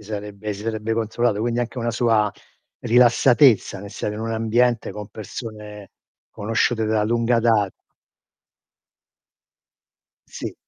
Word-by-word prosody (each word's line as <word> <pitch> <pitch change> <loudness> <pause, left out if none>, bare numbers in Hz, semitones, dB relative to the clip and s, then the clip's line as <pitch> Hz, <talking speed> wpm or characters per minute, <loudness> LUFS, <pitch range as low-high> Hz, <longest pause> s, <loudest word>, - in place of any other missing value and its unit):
Sì 105 - -15
sarebbe 105 0 -5
si 100 +1 -8
sarebbe 110 0 -2
controllato, 115 -1 0
quindi 120 +1 -1
anche 120 +1 -3
una 120 0 -1
sua 115 -3 +2 0.5
rilassatezza 120 -1 +4
nel 100 0 -9
stare 105 0 -4
in 110 - -6
un 115 0 -3
ambiente 115 0 +1
con 105 0 -8
persone 105 -1 -9 0.4
conosciute 115 +2 0
da 110 0 +1
lunga 115 +2 +1
da 110 -3 +3 2.6
Sì. - - -6
110 Hz, 125 wpm, -22 LUFS, 105-120 Hz, 2.6 s, rilassatezza